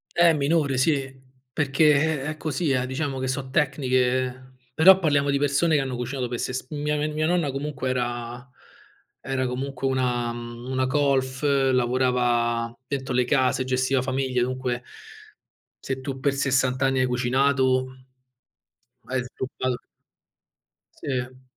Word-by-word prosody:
Eh, 170 -1 +5
minore, 145 -2 +1
sì. 135 0 +1 0.4
Perché, 145 +1 +1 0.4
eh, - - -6
è 155 0 -3
così, 155 0 -2
eh, 130 -1 +1
diciamo 135 0 -3
che 130 0 -2
so' 130 0 -3
tecniche 130 -2 0 0.3
però 190 +4 +7
parliamo 145 -5 +2
di 140 - +1
persone 145 +3 +2
che 140 - +1
hanno 130 -2 -3
cucinato 125 0 -3
per 120 -1 -4
ses 130 0 -3
mia 150 0 -1
n 150 +1 -1
mia 155 +1 0
nonna 170 -4 +1
comunque 135 -1 -3
era 120 0 -3 0.7
era 130 0 -2
comunque 135 +2 -3
una, 125 -2 0
mhmm, 120 +1 -8
una 130 0 +1
colf, 135 -1 +1 0.3
lavorava 120 -2 +1
dentro 135 -2 -3
le 125 0 +3
case, 130 -1 +2
gestiva 130 0 +1
famiglie, 130 -1 0
dunque 125 -1 -2 1.0
se 130 - -2
tu 135 0 -4
per 140 0 +2
60 130 -1 +1
anni 135 -1 +1
hai 130 - +3
cucinato, 130 +1 +1 1.2
hai 130 -1 -1
sgobbato 130 0 -4 1.1
Sì. 130 -1 -4
130 Hz, 140 wpm, -25 LUFS, 125-140 Hz, 1.2 s, però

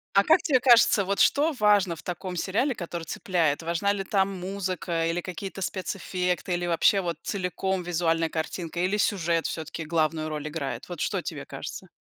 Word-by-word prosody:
А 200 - +6
как 320 +2 +5
тебе 270 -5 +3
кажется, 230 -5 +6
вот 200 +1 -1
что 305 +3 +4
важно 205 -4 +4
в 160 - -12
таком 180 +1 -5
сериале, 230 - 0
который 170 -2 -5
цепляет? 165 -3 0
Важна 170 +5 +1
ли 200 -1 -2
там 195 0 +1
музыка, 180 -3 -2
или 170 +1 0
какие-то 190 +2 -6
спецэффекты, 180 -1 -2
или 175 0 -1
вообще, 175 +4 +3
вот, 170 -3 -2
целиком 190 -1 -2
визуальная 165 -1 +1
картинка, 165 +1 -4
или 185 +3 +1
сюжет 170 -6 +1
все-таки 160 0 -5
главную 155 -1 0
роль 150 0 -4
играет? 140 -5 -5
Вот 175 -3 -7
что - - -1
тебе - - -6
кажется? - - -7
180 Hz, 175 wpm, -26 LUFS, 165-195 Hz, -, А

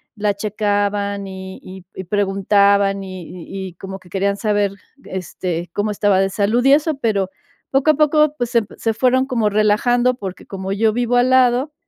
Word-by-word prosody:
la 210 -1 0
checaban, 205 -1 -1
y 190 0 -8
y 185 -1 -11
y 190 - -6
preguntaban, 200 0 +2
y 185 -1 -8
y 190 +2 -7
y - - -16
como 195 +2 -8
que 185 - -19
querían 200 +2 -1
saber, 205 -2 +1 0.3
este, 180 -2 -4
cómo 205 +1 -1
estaba 205 -2 +2
de 195 - +1
salud 210 +5 +1
y 270 - +7
eso, 310 +2 +2
pero 200 -6 0 0.4
poco 275 +3 +2
a - - -1
poco, 305 0 +3
pues, 245 -3 -2
se 235 -2 +3 0.2
se 225 - -1
fueron 255 +3 +2
como 230 -5 +1
relajando 225 +4 +2
porque 190 -6 -7
como 190 -1 -6
yo 215 +2 +2
vivo 245 +1 0
al 245 +1 +3
lado, 260 +3 +3
205 Hz, 180 wpm, -19 LUFS, 195-245 Hz, 0.4 s, y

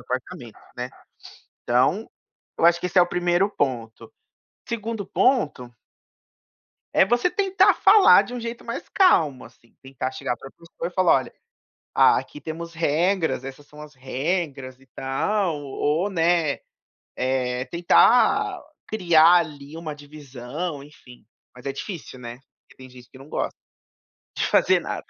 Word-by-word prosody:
apartamento, 125 0 -6 0.2
né, 125 0 -4 0.7
então, 130 - +1 0.5
eu - - +1
acho 170 0 +4
que 180 - -2
esse 180 +1 +1
é - - +8
o - - +1
1º 175 +2 +1
ponto, 120 - -4 0.6
2º 225 -2 -4
ponto 145 - 0 1.2
é - - +5
você 240 - +1
tentar 390 -1 +3
falar 395 +2 +6
de - - -10
um 245 - -5
jeito 235 0 -7
mais - - -6
calmo, 160 - +3
assim, 115 0 -20
tentar 130 -1 -5
chegar 130 -1 -4
para 135 - -11
a - - -24
pessoa 170 0 -8
e - - -13
falar: 185 -1 +3
"Olha, 130 - -4 0.6
a - - +5
aqui 150 - -9
temos 165 +3 -7
regras, 165 -1 0
essas 135 +2 -10
são 150 +1 -15
as 150 0 -12
regras, 135 0 -4
e 135 - -22
tal", 170 +7 -1
ou 150 +7 -1
né, 165 -4 +1 0.6
eh, 125 -1 -1
tentar 250 - +3 0.3
criar, 170 -5 +5
ali 150 -2 -6
uma 160 -2 -6
divisão, 145 +1 -7
enfim, 135 -4 -17 0.3
mas 125 +2 -14
é 135 - -2
difícil, 155 -2 -8
né, 120 0 -8 0.2
porque - - -24
tem 130 0 -13
gente 125 -1 -16
que 130 - -15
não 135 +2 -14
gosta, - - -3 0.8
de - - 0
fazer - - +3
nada. - - -6
155 Hz, 150 wpm, -23 LUFS, 130-180 Hz, 1.2 s, é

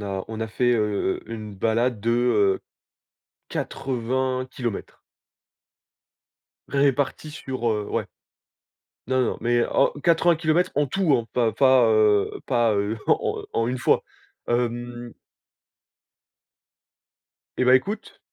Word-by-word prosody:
a 95 -2 -4
on 110 0 -6
a 110 - -1
fait, 120 +3 +1
heu, 105 -4 0
une 110 -2 -7
balade 115 +3 0
de, 115 - -3
heu 115 -5 +2 0.9
80km 130 -2 -3 1.7
répartis 140 +2 0
sur, 130 -5 -4
heu 105 -2 -1
ouais. - - -1 1.0
Non, 130 0 +1
non, - - -1
mais 120 +1 +2
en 135 - +2
80km 165 0 +2
en 145 - +2
tout 170 +2 +1
hein, 115 -2 -3
pas 115 -3 +1
pas, 130 -2 +5
heu 105 -2 +3 0.2
pas, 115 -2 +2
heu 100 +2 -1
en - - +1
en 115 - 0
une 125 +1 -2
fois, - - +2 0.5
hem 120 0 -2 2.5
Eh - - +2
ben 130 - +7
écoute 200 +11 -1
120 Hz, 115 wpm, -24 LUFS, 110-130 Hz, 2.5 s, ben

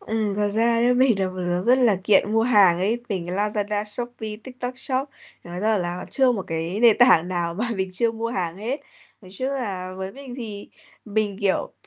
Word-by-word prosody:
Ừm, 215 -2 -2
thật 205 0 0
ra 230 +1 +3
ấy, 240 +2 +3
mình 250 -4 +3
là 190 - +1
một 185 - -9
đứa 175 -1 -1
rất 245 +5 +4
là 235 -6 +4
nghiện 210 +1 +4
mua 225 - +3
hàng 205 -8 +5
ấy, 215 +6 0
mình 185 -6 -3
Lazada, 205 +2 -1
Shopee, 220 0 -5
TikTok 255 -1 -6
Shop, 265 +1 -2 0.4
nói 175 +1 -6
ra 215 +1 +2
là 175 0 -4
chưa 265 - +2
có 250 - +4
một 205 -5 -3
cái 165 +4 -3
nền 230 -3 +6
tảng 205 -9 +6
nào 175 -2 -2
mà 230 +6 -2
mình 190 -1 -2
chưa 225 +5 +1
mua 230 0 -3
hàng 180 -7 -3
hết. 240 +8 -3 0.4
Nói 185 - -14
chung 260 - -1
là 195 -9 -4
với 190 0 -5
mình 270 -2 -9
thì 215 -5 -7 0.4
mình, 210 -2 -1
kiểu, 195 -2 0
210 Hz, 220 wpm, -23 LUFS, 185-240 Hz, 0.4 s, nền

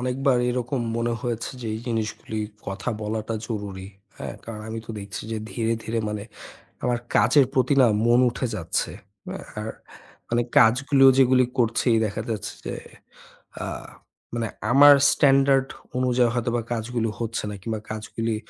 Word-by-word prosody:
অনেকবার 130 +1 +1
এরকম 125 +1 -2 0.2
মনে 120 0 0
হয়েছে 115 -1 -3
যে 115 - -5
এই 110 - -5
জিনিসগুলি 110 -1 -3 0.3
কথা 100 +4 -3
বলাটা 110 +1 -3
জরুরি। 100 -4 -5 0.3
হ্যাঁ, - - -6
কারণ 110 -2 -7
আমি 115 0 -4
তো - - -7
দেখছি 100 -1 -7
যে 110 - -2
ধীরে, 115 -1 -1
ধীরে 115 +1 -2
মানে 105 -1 -4 0.6
আমার 120 -1 +1 0.2
কাজের 140 -4 +5
প্রতি 130 +2 +3
না 125 - +7 0.2
মন 120 +1 +5
উঠে 125 +1 -3
যাচ্ছে। 85 -5 -2 0.4
অ্যা - - -5 0.2
আর 110 - -4 0.6
মানে 120 0 +1 0.2
কাজগুলো 135 +3 +5
যেগুলি 130 -1 +5
করছি 115 +1 +2 0.2
দেখা 105 +1 -4
যাচ্ছে 105 -3 -4
যে, - - -3 0.9
আ - - -3 0.7
মানে 115 -2 -1 0.2
আমার 145 +2 +9 0.2
স্ট্যান্ডার্ড 135 -1 +4 0.3
অনুযায়ী 125 -1 +3
হয়তোবা 120 0 0
কাজগুলো 115 0 -2
হচ্ছে 115 -1 -3
না 105 - -5
কিংবা 110 0 -3
কাজগুলি 110 +1 -3
115 Hz, 150 wpm, -24 LUFS, 110-125 Hz, 0.9 s, আমার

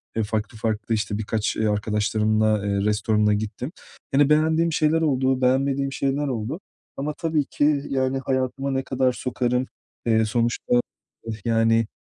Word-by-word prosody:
Eee, 110 - +1
farklı 110 0 -3
farklı 110 0 -1
işte 105 -1 -2
birkaç, 110 0 -1
eee, 110 - 0
arkadaşlarımla, 105 0 +1
eee, 100 0 0
restorana 105 0 +2
gittim. 110 +6 -3 0.4
Hani, 140 +1 +4
beğendiğim 160 +2 +3
şeyler 155 +1 +2
oldu, 130 -4 +1
beğenmediğim 135 +2 +1
şeyler 140 +2 -1
oldu 125 - -3 0.4
ama 145 +2 -2
tabii 160 -3 0
ki, 145 0 +1
yani, 130 0 0
hayatıma 135 +1 -1
ne 135 0 -1
kadar 130 0 +1
sokarım? 125 0 -1 0.4
Eee, 110 -1 +3
sonuçta, 120 +2 0 0.7
yani, 115 -1 +3
125 Hz, 140 wpm, -24 LUFS, 110-135 Hz, 0.7 s, Hani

